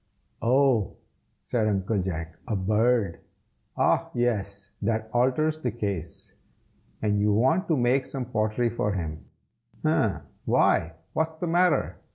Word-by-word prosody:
"Oh!" 125 -3 +2 0.5
said 110 -3 0
Uncle 100 0 0
Jack; 85 -3 -4
"a 110 - -1
bird! 105 0 +1 0.6
ah - - +2
yes! 100 -4 -1
that 110 +1 -1
alters 145 +6 +2
the 125 - -1
case. 100 -7 -5 0.7
And 105 -1 +2
you 105 +1 +3
want 130 - +2
to 160 - +2
make 130 +2 +2
some 130 -2 -5
pottery 115 0 0
for 105 -3 -1
him, 80 -5 -4 0.6
eh? - - +2 0.2
why, 80 0 +3 0.2
what's 160 0 0
the 165 - -4
matter? 175 +1 +2
110 Hz, 130 wpm, -26 LUFS, 100-130 Hz, 0.7 s, you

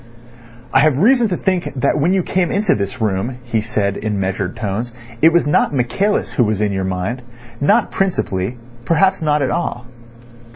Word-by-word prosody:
"I - - +5
have 145 -1 +3
reason 235 - +4
to 180 - -1
think 185 -2 -1
that 150 - +1
when 165 +5 +2
you 190 -1 +2
came 180 -1 0
into 200 -1 +1
this 100 +4 -3
room," 110 +3 -1
he 115 -2 -1
said 100 -2 -1
in 105 -2 -2
measured 95 -1 -2
tones, 110 +2 -3 0.3
"it 160 - +7
was 170 -2 +3
not 145 0 +2
Michaelis 130 - 0
who 125 - +3
was 105 -2 0
in 105 -1 +1
your 95 -1 -2
mind; 95 +7 -3 0.4
not 145 - +3
principally—perhaps 125 - -1
not 150 -2 +1
at 130 - 0
all." 125 -8 -3
125 Hz, 175 wpm, -18 LUFS, 105-170 Hz, 0.4 s, it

